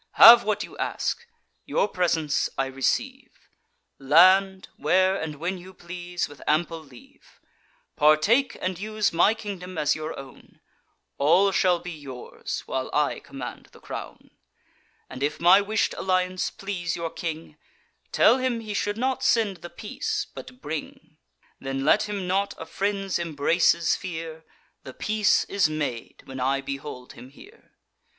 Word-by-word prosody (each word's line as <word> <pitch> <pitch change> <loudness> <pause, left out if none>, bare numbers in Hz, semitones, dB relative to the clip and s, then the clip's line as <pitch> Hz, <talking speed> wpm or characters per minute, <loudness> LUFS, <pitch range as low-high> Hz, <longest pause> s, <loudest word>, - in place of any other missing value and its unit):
Have 235 +1 +10
what 215 0 -1
you - - -11
ask; 475 - -2 0.4
your - - 0
presents 170 -6 0
I 135 - +1
receive; 250 - -3 0.5
Land, 185 +7 +5
where 185 +1 +3
and 160 -5 -4
when 175 +5 -3
you 185 +1 -13
please, 175 0 -5
with 145 - -14
ample 165 +2 +1
leave; 135 -6 -18 0.6
Partake 155 - +3
and 185 -1 -3
use 215 -1 -1
my 195 +6 +4
kingdom 185 -5 -7
as 150 -2 +2
your 155 +1 -5
own; 135 -1 -13 0.6
All 175 +8 +4
shall 180 -2 +3
be 175 +1 -8
yours, 140 -6 -7
while 130 0 -3
I 150 0 +1
command 135 -3 -9
the - - -16
crown: - - -9 0.8
And, 130 - -9
if 150 +2 -1
my 180 +4 +6
wish'd 215 +2 0
alliance 185 -1 0
please 180 -4 -4
your 165 -1 -4
king, 160 -2 -6 0.6
Tell 260 - +5
him 255 -2 -1
he 215 -2 -6
should 205 +1 -1
not 260 +2 -1
send 215 -5 +2
the 175 +1 -10
peace, 270 - -4
but 255 0 -11
bring. 150 0 -7 0.4
Then 135 0 -3
let 210 - +3
him 200 -3 -3
not 195 +2 0
a 160 - -7
friend's 195 0 -2
embraces 165 +1 +2
fear; 160 -3 -7 0.4
The 130 - -11
peace 215 -1 +2
is 200 -5 +1
made 145 -7 -4
when 130 0 -8
I 135 +2 +1
behold 135 -2 -7
him 125 - -12
here. 400 - -18
175 Hz, 145 wpm, -25 LUFS, 150-200 Hz, 0.8 s, Have